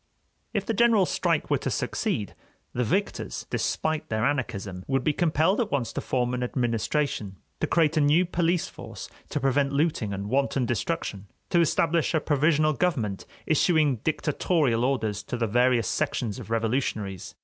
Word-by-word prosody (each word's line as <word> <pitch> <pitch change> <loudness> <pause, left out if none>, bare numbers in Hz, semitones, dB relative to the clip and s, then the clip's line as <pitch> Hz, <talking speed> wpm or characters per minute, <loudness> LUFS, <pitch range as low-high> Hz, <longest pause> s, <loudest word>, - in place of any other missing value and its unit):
If 205 -4 -1
the 225 - -1
general 225 -3 +4
strike - - 0
were - - +3
to - - -2
succeed, 155 - -2 0.4
the 125 - 0
victors, 195 - -2
despite 155 -1 -1
their 110 0 0
anarchism, 105 -10 -2
would 135 -1 +1
be 150 - +2
compelled 170 - +2
at 220 - -1
once 125 -5 -1
to - - -3
form 125 -1 -1
an 125 - -2
administration, 120 -3 -1 0.2
to - - 0
create 160 -1 +2
a - - +4
new 150 +5 +4
police 170 0 0
force - - -9 0.2
to - - -1
prevent 135 +1 +1
looting 140 -8 0
and 100 0 -4
wanton 135 +1 +1
destruction, 115 - -3 0.2
to 175 - +4
establish 165 0 +2
a - - +4
provisional 155 +1 +2
government 125 - -1 0.2
issuing 155 -3 +3
dictatorial 145 -2 +1
orders 110 -6 -1
to 115 +4 -5
the 115 - 0
various 120 0 +2
sections 105 -5 -1
of - - -9
revolutionaries. 110 -4 -2
135 Hz, 160 wpm, -26 LUFS, 115-160 Hz, 0.4 s, general